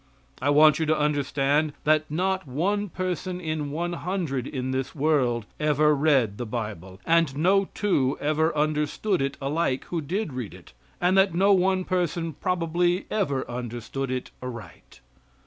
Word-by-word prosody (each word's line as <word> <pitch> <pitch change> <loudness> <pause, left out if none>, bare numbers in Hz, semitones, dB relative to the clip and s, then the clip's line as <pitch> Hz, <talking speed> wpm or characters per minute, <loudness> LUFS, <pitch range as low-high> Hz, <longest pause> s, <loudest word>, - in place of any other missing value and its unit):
I 145 - +1
want 150 +2 +6
you 160 - 0
to 155 0 +2
understand 145 0 +1
that 155 +1 +2
not 185 +2 -1
one 200 +10 -1
person 185 0 -3
in 155 -4 -3
one 170 +4 -2
hundred 170 -8 -2
in 130 -2 -3
this 130 +3 -3
world 135 -7 +1
ever 150 0 +3
read 135 -8 +2
the 120 - -3
Bible, 105 -5 -5
and 165 -5 +2
no 190 +5 +3
two 145 -11 +1
ever 155 +2 +1
understood 155 +5 0
it 140 0 -2
alike 140 -1 -1
who 170 -2 -2
did 170 +2 -3
read 125 -5 -5
it, - - -16 0.3
and 180 +2 +2
that 190 -3 +3
no 195 +3 +5
one 190 0 +2
person 175 -3 -1
probably 175 +3 0
ever 145 -11 -1
understood 120 +2 -5
it 130 0 -4
aright. 115 -8 -9
155 Hz, 155 wpm, -25 LUFS, 135-175 Hz, 0.3 s, want